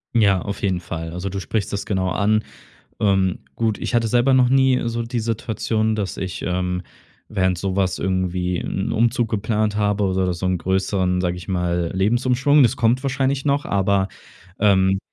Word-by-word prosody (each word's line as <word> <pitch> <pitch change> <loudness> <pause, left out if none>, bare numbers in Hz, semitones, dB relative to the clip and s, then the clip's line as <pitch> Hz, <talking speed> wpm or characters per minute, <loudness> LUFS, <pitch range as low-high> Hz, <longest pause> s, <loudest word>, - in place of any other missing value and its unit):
Ja, 100 -5 +4
auf 100 -1 -5
jeden 95 -3 0
Fall. 80 -1 -6
Also 90 +2 -4
du 100 +1 -4
sprichst 105 +1 -2
das 100 - -3
genau 95 -2 -1
an. 110 +3 +1 0.6
Ähm, 95 -3 +1 0.2
gut, 110 -2 0
ich - - -4
hatte 115 -1 +2
selber 125 +3 +3
noch 130 -1 +5
nie 130 -1 +3
so 115 0 -2
die 120 0 -3
Situation, 110 -1 -1
dass 105 -3 -3
ich, 95 -3 -5
ähm, 90 0 -1 0.5
während 95 -2 0
so 95 0 -2
was 95 -2 0
irgendwie 90 -1 -1
'n 95 - -3
Umzug 115 0 +1
geplant 105 0 -1
habe 105 -1 +1
oder 95 -1 +1
so 90 +2 -3
'n 90 0 +1
größeren, 95 0 0
sage 90 -1 -1
ich 90 +1 -10
mal, 90 -2 -1
Lebensumschwung. 125 +8 +3
Das 120 +1 +3
kommt 120 +3 +2
wahrscheinlich 135 0 0
noch, 145 0 +1
aber, 100 0 +1 0.5
ähm, 95 -2 +4
100 Hz, 180 wpm, -21 LUFS, 95-115 Hz, 0.6 s, noch